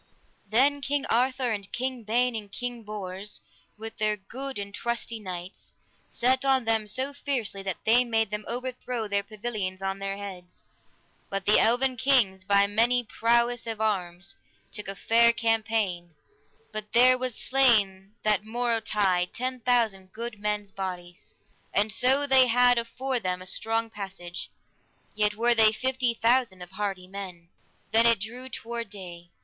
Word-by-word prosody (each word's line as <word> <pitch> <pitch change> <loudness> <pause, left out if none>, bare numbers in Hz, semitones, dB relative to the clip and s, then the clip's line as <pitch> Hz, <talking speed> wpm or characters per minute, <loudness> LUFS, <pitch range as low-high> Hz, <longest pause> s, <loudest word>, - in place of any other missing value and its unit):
Then 275 +6 +3
King 285 +1 -1
Arthur 255 +1 +1
and 200 -3 -5
King 255 0 -3
Ban 245 +3 +1
and 210 -3 -6
King 245 +2 -4
Bors, 205 -1 -6 0.4
with 225 +1 -8
their 215 0 +1
good 265 +7 -6
and 200 0 -6
trusty 235 0 -3
knights, 185 -2 -8 0.3
set 255 +2 +1
on 265 -3 +2
them 225 -1 +1
so 260 +6 0
fiercely 245 -8 -2
that 190 -2 -4
they 235 +3 +5
made 225 -3 0
them 210 0 -3
overthrow 250 -2 -4
their 200 0 0
pavilions 205 -3 -4
on 195 0 -3
their 195 0 -4
heads, 185 -3 -10 0.6
but 195 -1 -3
the 210 - +6
eleven 250 +2 +3
kings, 240 -8 +3
by 200 +1 +4
manly 235 +4 +2
prowess 235 +1 +1
of 225 -2 -4
arms, 190 -4 -2 0.4
took 210 - -5
a 195 - -2
fair 235 +3 +5
champaign, 220 -7 -1 0.6
but 215 0 -5
there 255 +2 +7
was 255 -2 -2
slain 210 -7 +2
that 210 -2 +2
morrowtide 215 -6 0
ten 255 +1 -3
thousand 225 -6 0
good 230 0 -6
men's 210 -1 -2
bodies. 180 -2 -7 0.4
And 210 +2 +3
so 265 +5 +4
they 265 -2 +6
had 245 0 +4
afore 250 +2 -2
them 180 -4 -2
a 185 - -8
strong 225 +4 -1
passage, 190 -4 -7 0.6
yet 210 0 +1
were 240 +2 +3
they 220 -2 +6
fifty 255 0 0
thousand 230 -5 +1
of 180 - -13
hardy 195 -2 -4
men. 185 -3 -8 0.4
Then 225 +2 +6
it 230 -3 +5
drew 245 +5 -6
toward 235 -2 -5
day. 175 -4 -9
220 Hz, 155 wpm, -27 LUFS, 195-245 Hz, 0.6 s, there